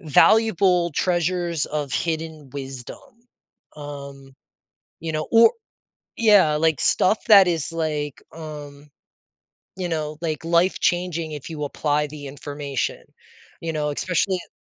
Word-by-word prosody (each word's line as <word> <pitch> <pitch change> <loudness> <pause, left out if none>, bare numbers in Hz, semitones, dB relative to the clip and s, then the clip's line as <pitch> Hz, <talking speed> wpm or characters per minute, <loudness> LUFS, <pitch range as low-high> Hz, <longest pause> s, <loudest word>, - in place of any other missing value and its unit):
valuable 180 +1 +4
treasures 175 0 0
of 145 -3 -4
hidden 160 -3 -3
wisdom. 135 -2 -7 0.8
Um, 140 -2 -9 0.7
you 160 -1 -4
know 155 0 -3
or 230 - +7 0.6
yeah, 205 -9 +5
like, 160 -1 +1
stuff 210 +4 +3
that 200 -4 +8
is, 165 -2 -1
like, 150 -3 -3
um, 150 -2 -9 0.9
you 185 -2 -3
know, 155 -2 -3
like, 160 -2 -3
life 170 +2 +2
changing 175 -2 0
if 145 -3 -7
you 150 -2 -5
apply 150 +1 -1
the 145 -1 -9
information, 145 -1 -4 0.6
you 165 -1 -3
know, 150 -1 -1
especially 185 +5 0
at 180 - -9
155 Hz, 125 wpm, -23 LUFS, 145-175 Hz, 0.9 s, that